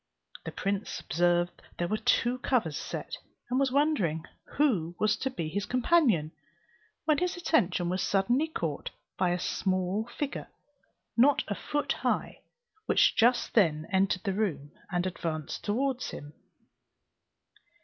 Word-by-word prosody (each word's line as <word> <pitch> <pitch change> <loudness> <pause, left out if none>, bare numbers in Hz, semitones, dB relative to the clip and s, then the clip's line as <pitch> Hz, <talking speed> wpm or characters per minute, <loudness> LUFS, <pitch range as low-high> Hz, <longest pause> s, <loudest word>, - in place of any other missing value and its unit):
The - - -4
prince 200 +1 -2
observed 175 +1 +1 0.2
there 175 - 0
were 215 - 0
two 240 +3 +1
covers 225 - 0
set, - - -5 0.3
and 255 - +2
was 275 -2 +2
wondering 255 - +1 0.3
who 195 - +2
was 215 0 +2
to 265 - -1
be 170 -11 -4
his 200 +5 -3
companion, 250 - +3 0.7
when 305 -2 +3
his 360 0 -1
attention 190 - +1
was 185 +1 -1
suddenly 240 +10 +2
caught 165 - -3 0.3
by 185 -1 +1
a 175 - +1
small 185 +3 -1
figure 290 -1 -3 0.7
not 265 +4 +5
a - - +1
foot 295 +8 -2
high, - - -1 0.5
which - - +4
just 240 +2 +3
then 160 -8 +3
entered 190 -1 +2
the 195 - 0
room, 160 -9 -2 0.2
and 175 0 0
advanced 160 -4 -4
towards 255 +4 -1
him. 145 +1 -8
200 Hz, 140 wpm, -29 LUFS, 175-255 Hz, 0.7 s, not